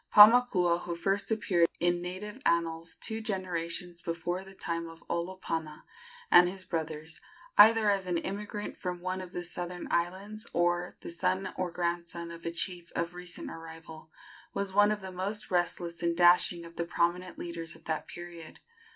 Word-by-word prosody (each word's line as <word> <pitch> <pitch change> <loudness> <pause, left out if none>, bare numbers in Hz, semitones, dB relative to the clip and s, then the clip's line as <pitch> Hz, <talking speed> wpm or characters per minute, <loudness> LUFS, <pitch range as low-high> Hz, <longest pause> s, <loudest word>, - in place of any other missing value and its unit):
Paumakua, 210 -6 +7
who 175 -1 -4
first 195 +4 0
appeared 190 -6 +3
in 175 0 +2
native 205 +7 -6
annals 165 - +1
two 220 0 -3
generations 175 -4 -3
before 175 +1 -3
the 195 0 -13
time 170 -2 -3
of 165 0 -14
Olopana 170 -3 -3 0.5
and 175 0 +8
his 190 0 -7
brothers, 160 -1 -4 0.3
either 220 +1 +8
as 195 -2 +2
an 175 -1 +1
immigrant 205 +4 -4
from 180 -1 -4
one 185 +1 -2
of 180 -1 -8
the 175 - -4
southern 175 0 -4
islands 195 +6 -2
or 175 +1 +1
the - - -7
son 185 +3 -1
or 185 -1 -1
grandson 170 0 -3
of 170 0 -7
a - - -1
chief 175 0 -1
of 170 +1 -1
recent 180 0 -5
arrival, 160 -1 -10 0.5
was 200 -1 -2
one 205 +1 +6
of 210 -1 -2
the 190 0 -6
most 200 +4 -1
restless 175 -1 0
and 170 -1 0
dashing 175 -1 +5
of 170 0 -13
the 170 - -1
prominent 175 +1 0
leaders 170 -1 -5
of - - -16
that 155 -2 -2
period. 175 -2 -9
175 Hz, 170 wpm, -30 LUFS, 170-190 Hz, 0.5 s, and